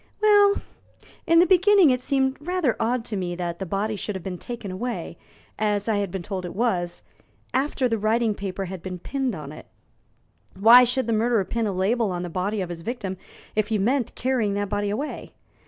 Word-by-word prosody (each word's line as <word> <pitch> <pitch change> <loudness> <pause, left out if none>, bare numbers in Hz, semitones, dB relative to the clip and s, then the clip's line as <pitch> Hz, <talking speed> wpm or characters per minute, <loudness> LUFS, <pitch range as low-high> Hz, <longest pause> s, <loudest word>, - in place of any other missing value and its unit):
"Well, 410 -1 +5 0.6
in 335 - +5
the 345 - +7
beginning 375 -2 +5
it 250 0 0
seemed 265 0 0
rather 345 -6 0
odd 230 +1 0
to 225 - -3
me 180 -2 -3
that 175 -1 -4
the 190 - -4
body 205 +4 -1
should 205 0 -4
have 190 - -6
been 180 -1 -5
taken 235 -5 -6
away, 235 +6 -4 0.4
as 210 -1 0
I 220 -2 +1
had 200 -2 -1
been 185 0 -5
told 190 0 -4
it 180 - -7
was, 185 -6 -1 0.5
after 265 0 +1
the 225 -2 -1
written 220 +1 +1
paper 195 -1 -4
had 185 -1 -7
been 185 0 -6
pinned 260 +4 -2
on 150 -3 -8
it. 155 - -11 0.9
Why 235 +4 +8
should 250 +2 +1
the 230 - 0
murderer 225 -2 +2
pin 230 +1 -1
a - - -1
label 205 +4 +1
on 175 0 -3
the 175 - -5
body 195 +4 -1
of 180 - -4
his 170 -1 -6
victim 200 -2 -4 0.4
if 215 -1 +1
he 220 -1 0
meant 240 +5 0
carrying 235 -6 0
that 205 -1 -2
body 205 0 -1
away? 255 +9 -4
215 Hz, 205 wpm, -24 LUFS, 190-250 Hz, 0.9 s, Why